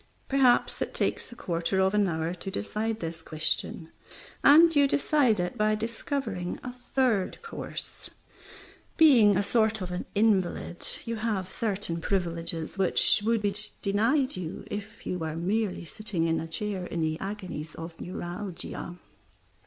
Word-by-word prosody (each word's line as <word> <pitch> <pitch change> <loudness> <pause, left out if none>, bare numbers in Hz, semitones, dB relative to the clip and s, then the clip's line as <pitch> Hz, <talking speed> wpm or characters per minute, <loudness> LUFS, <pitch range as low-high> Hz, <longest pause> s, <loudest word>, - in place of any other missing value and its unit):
Perhaps 265 -3 +3
it - - -2
takes - - 0
a - - -9
quarter 170 -2 -1
of 190 +1 +3
an 205 -1 +3
hour 160 0 -1
to 180 +2 -7
decide 220 +2 -2
this 165 0 -4
question, 160 +1 -3 0.5
and 325 +3 +8
you 285 -1 +6
decide 275 -6 +3
it 180 +6 -2
by 215 0 +3
discovering 220 -4 -3
a 250 - -4
third 245 -4 0
course. 460 - -6 0.9
Being 235 - +7
a 200 - +2
sort 220 0 +2
of 185 -2 -5
an 180 - -4
invalid, 195 -5 +1 0.2
you 230 0 -3
have 210 -4 -2
certain 195 -6 -2
privileges 170 -2 -2
which 190 +2 +4
would 225 0 +1
be 200 -1 +1 0.3
denied 235 +8 +2
you 175 -2 -5
if 210 +1 -6
you 180 - -2
were 160 -1 -3
merely 190 +2 -1
sitting 190 0 -3
in 165 0 +1
a 165 - -4
chair 190 +2 -3
in 170 - -3
the 155 0 0
agonies 185 -6 -5
of 165 0 -8
neuralgia. 175 -1 -5
200 Hz, 150 wpm, -28 LUFS, 175-225 Hz, 0.9 s, and